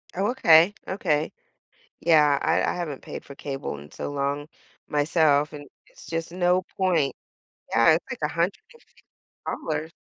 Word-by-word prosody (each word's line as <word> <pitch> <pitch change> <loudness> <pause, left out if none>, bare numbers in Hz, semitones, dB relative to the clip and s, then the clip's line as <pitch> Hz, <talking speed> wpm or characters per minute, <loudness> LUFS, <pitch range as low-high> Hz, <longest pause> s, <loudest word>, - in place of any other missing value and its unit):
Oh, 195 +3 +1
okay, 170 -6 +6 0.2
okay. 160 -5 0 0.7
Yeah. 150 -4 +4
I - - +2
I - - 0
haven't 165 -6 -4
paid - - -8
for 140 - -10
cable 135 - -5
in 75 +1 -13
so - - -5
long 140 +1 -2 0.4
myself, 150 -1 +2
and 145 -1 -9 0.2
it's - - -16
just 165 0 -4
no 180 0 +2 0.2
point. 175 -7 +1 0.6
Yeah. 115 +4 +5
It's 165 - -2
like, 255 - -5
$150. 165 - -5
160 Hz, 135 wpm, -25 LUFS, 145-175 Hz, 0.7 s, okay